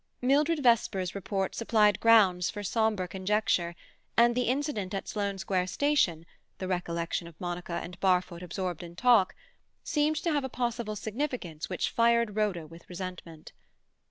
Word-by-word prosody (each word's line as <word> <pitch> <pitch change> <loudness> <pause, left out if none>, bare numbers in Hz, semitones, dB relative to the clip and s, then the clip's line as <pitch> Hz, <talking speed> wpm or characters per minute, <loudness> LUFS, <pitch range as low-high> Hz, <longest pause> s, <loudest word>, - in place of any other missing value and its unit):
Mildred 295 +4 +2
Vesper's 210 -6 +2
report 195 0 -2
supplied 215 -3 +3
grounds 195 -6 +5
for 205 -1 -6
sombre 215 -2 0
conjecture, 190 -2 0 0.4
and 235 +1 +6
the 250 0 0
incident 250 -8 -1
at 195 - -4
Sloane 200 -2 -2
Square 185 -1 -1
Station, 185 - +1 0.3
the 185 - -4
recollection 170 -2 -2
of 170 -1 -15
Monica 175 -1 -4
and 175 0 -9
Barfoot 180 -2 +1
absorbed 180 -1 -4
in 170 -1 -10
talk, 230 -3 +4 0.5
seemed 300 +1 +1
to 330 +2 -1
have 290 -2 +1
a 265 - -3
possible 235 -3 -2
significance 215 - -4
which - - -1
fired 235 -2 +2
Rhoda 200 -6 0
with 165 +2 -15
resentment. 175 -3 -8
200 Hz, 150 wpm, -29 LUFS, 180-235 Hz, 0.5 s, and